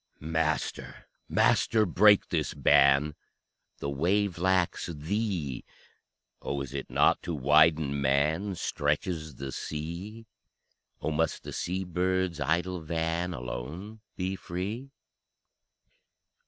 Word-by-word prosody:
Master, 80 -2 -2 0.2
Master, 110 -2 +3
break 105 +3 +5
this - - -1
ban: 70 +2 +4 0.6
The 70 - -4
wave 90 +5 0
lacks 95 -1 +1
Thee. 85 - -3 0.8
Oh, 70 0 -3
is 70 -1 -6
it 70 - -5
not - - +3
to 85 - -4
widen 75 0 +4
man 75 +9 +1
Stretches 75 0 -2
the 70 +1 -6
sea? 85 - -6 0.8
Oh, 80 - 0
must 80 +1 -1
the - - -7
sea 95 +2 -2
bird's 90 -1 -1
idle 85 +5 0
van 80 +2 -1
Alone 75 - -6 0.2
be 95 +1 -2
free? 100 +9 -5
80 Hz, 105 wpm, -29 LUFS, 75-95 Hz, 0.8 s, break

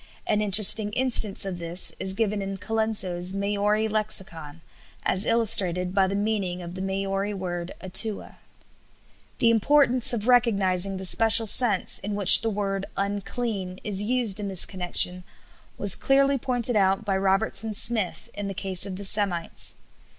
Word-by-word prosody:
An 210 - -1
interesting 210 +1 +4
instance 230 -6 +2
of 185 -2 -6
this 170 +2 -1
is 190 0 0
given 210 -1 -2
in 195 0 -6
Colenso's 195 -4 -1
Maori 205 +2 -1
Lexicon 190 -8 -2 0.4
as 190 +2 -1
illustrated 190 -6 +1
by 195 -1 +1
the 195 - -4
meaning 200 -4 -3
of 170 0 -9
the 185 - -8
Maori 195 +1 -4
word 175 -2 -6
atua. 200 +3 +1 1.0
The 230 - +2
importance 255 +1 +3
of 230 -2 -3
recognizing 195 -6 +1
the 190 - -7
special 225 +3 +4
sense 215 -2 +2
in 205 +1 -6
which 200 -2 +8
the 225 - -1
word 195 -2 -4
"unclean" 200 -1 -5
is 200 -2 0
used 225 -2 -2
in 205 - -5
this 190 -3 -1
connection 180 -1 +1 0.5
was 200 -2 +2
clearly 275 0 +1
pointed 245 -1 -1
out 195 +1 0
by 195 -2 -2
Robertson 195 +2 -2
Smith 220 -4 0
in 205 -1 -7
the 195 - -7
case 190 -1 -1
of 190 - -7
the 200 +2 -5
Semites. 190 -4 -1
200 Hz, 150 wpm, -23 LUFS, 190-220 Hz, 1.0 s, which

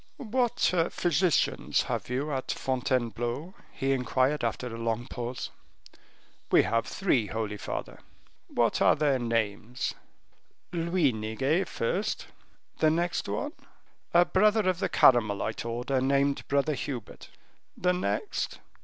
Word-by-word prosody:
"What 245 - +1 0.2
physicians 175 0 +1
have - - -3
you 140 +4 -1
at 130 -1 -2
Fontainebleau?" 125 - -1 0.2
he 135 -1 -1
inquired, 130 +2 +1
after 115 +2 -1
a 115 -2 -5
long 115 +1 -1
pause. 125 0 -5 1.0
"We - - +6
have 115 0 0
three, 135 - +1
holy 110 -1 -3
father." - - -5 0.5
"What - - +1
are - - +6
their 140 -4 +2
names?" 115 +1 -1 0.8
"Luiniguet 150 - +1
first." 200 - -2 0.5
"The 155 - +5
next 170 +2 0
one?" 295 +1 -2 0.6
"A 175 +1 +6
brother 210 +2 +3
of 185 -2 +1
the 190 -2 0
Carmelite 110 -7 +3
order, 125 +3 -1
named 140 +1 +1
Brother 140 +2 +2
Hubert." 130 -5 -6 0.5
"The 180 0 +2
next?" 185 - -2
135 Hz, 120 wpm, -28 LUFS, 120-175 Hz, 1.0 s, We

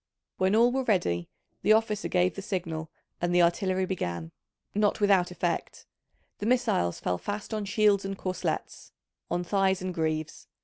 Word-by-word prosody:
When 190 +2 +3
all 235 +2 +5
were 265 +1 0
ready, 85 - 0 0.3
the 215 - +5
officer 220 -2 +1
gave 180 -1 +2
the 195 - -6
signal 165 -5 -3 0.3
and 175 0 +1
the 175 - +6
artillery 185 +2 +1
began, 85 - -3 0.4
not 210 +1 +2
without 195 -4 +4
effect: 180 - -3 0.5
the 205 - -2
missiles 235 - +1
fell 90 -1 -1
fast 205 +2 -5
on 215 -1 -2
shields 205 0 +3
and 195 0 -4
corslets, 185 -2 -4 0.4
on 175 +1 -1
thighs 190 0 +2
and 185 0 -4
greaves. 155 -2 -2
185 Hz, 160 wpm, -28 LUFS, 170-205 Hz, 0.5 s, the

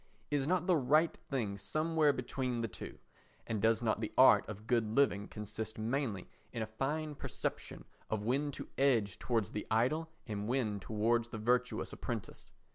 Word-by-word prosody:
Is 145 -2 +1
not 180 0 +2
the 180 -3 +4
right 155 +5 +3
thing 110 -8 -2
somewhere 155 - +2
between 125 -2 -2
the 115 - 0
two? 90 -4 -8 0.5
And 110 -3 -2
does 115 +1 +3
not 110 -2 +1
the 110 - -2
art 130 - +7
of 105 0 -7
good 115 -1 +2
living 105 -8 +3
consist 110 +1 -5
mainly 110 -3 -1 0.2
in 115 -2 -2
a 110 0 -8
fine 150 +3 -1
perception - - -4 0.2
of 110 -1 -1
when 135 +6 +1
to - - -7
edge 120 -8 +3
towards 115 -5 0
the 105 - -4
idle 130 +9 +1 0.2
and 105 -1 -4
when 115 -5 0
towards 115 +3 +1
the 115 - -5
virtuous 125 +3 0
apprentice? - - -6
120 Hz, 170 wpm, -34 LUFS, 110-140 Hz, 0.5 s, art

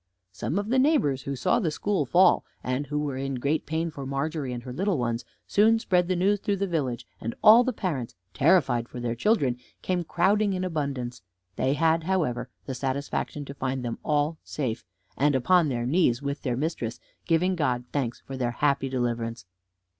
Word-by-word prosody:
Some 150 - -3
of 205 +1 -2
the 260 +2 +3
neighbors 165 - +3
who 140 +1 -4
saw 130 - +2
the 180 -8 0
school 160 -1 -1
fall, 180 +8 +5 0.2
and 130 +3 -2
who 150 +2 -2
were 145 -3 -2
in 135 0 -2
great 140 +5 -1
pain 160 +1 -1
for 140 -2 -7
Margery 140 +1 -2
and 120 -1 -5
her 125 0 -7
little 190 +4 0
ones, 120 -1 -1 0.2
soon 220 +2 +4
spread 180 -6 +1
the 185 - +1
news 200 +3 +2
through 200 +1 0
the 200 0 -1
village, 130 -9 -2
and 115 +1 -4
all 225 +3 +9
the 255 - 0
parents, 155 - -3 0.2
terrified 130 -7 +3
for 125 - -7
their 120 -1 -1
children, 130 - +1 0.3
came 180 -1 0
crowding 200 +5 +2
in 185 0 -2
abundance; 140 -8 -3 0.3
they 130 +1 +1
had, 160 +2 +2
however, 130 -10 0 0.2
the 135 - -4
satisfaction 140 +2 -3
to 140 - -7
find 130 -2 -3
them 115 - -4
all 150 +1 0
safe, 125 -7 -3 0.3
and 145 +1 +3
upon 165 +5 +4
their 120 -2 -2
knees 130 -4 +2
with 140 +1 -4
their 125 -3 -1
mistress, 125 -6 -3 0.3
giving 180 +2 +2
God 125 -7 0
thanks 125 -5 -2
for 135 - -8
their 125 -2 -1
happy 135 +2 +1
deliverance. 120 -3 -2
145 Hz, 190 wpm, -26 LUFS, 125-180 Hz, 0.3 s, all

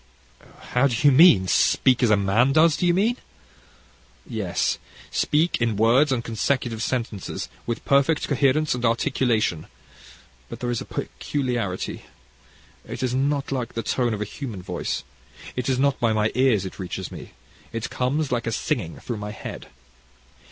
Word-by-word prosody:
How 125 +3 +4
do 125 - -1
you - - +8
mean 135 - +7
speak 130 +6 +3
as 120 - +4
a 105 - +5
man 105 +7 +2
does, 160 0 +5
do 180 - 0
you 175 - +4
mean?" 225 +6 +2 1.1
"Yes; - - -1 0.3
speak 155 -2 +1
in 115 -2 +1
words 125 +7 +4
and 120 -3 0
consecutive 115 0 -1
sentences, 115 - -3 0.2
with 115 - -3
perfect 140 +3 +2
coherence 145 +2 +2
and 125 -1 -4
articulation; 115 - +1 0.8
but - - -8
there 120 -1 -2
is 120 - -2
a - - -6
peculiarity. 120 -9 -3 0.8
It - - -6
is 125 -1 0
not 140 +2 0
like 125 -4 -3
the 115 - -2
tone 120 -4 0
of 105 - -6
a - - -1
human 105 -4 -7
voice. - - -3 0.5
It 125 0 -2
is 130 - +1
not 140 +1 +1
by 115 -2 +2
my 110 0 +1
ears 125 -6 +2
it 95 - -8
reaches 95 0 -5
me - - -10 0.4
it 115 -1 -4
comes 135 +3 -1
like 120 -1 -1
a - - 0
singing 90 -5 -2
through 120 - -4
my 105 0 -5
head. 105 - -8
125 Hz, 165 wpm, -24 LUFS, 110-140 Hz, 1.1 s, you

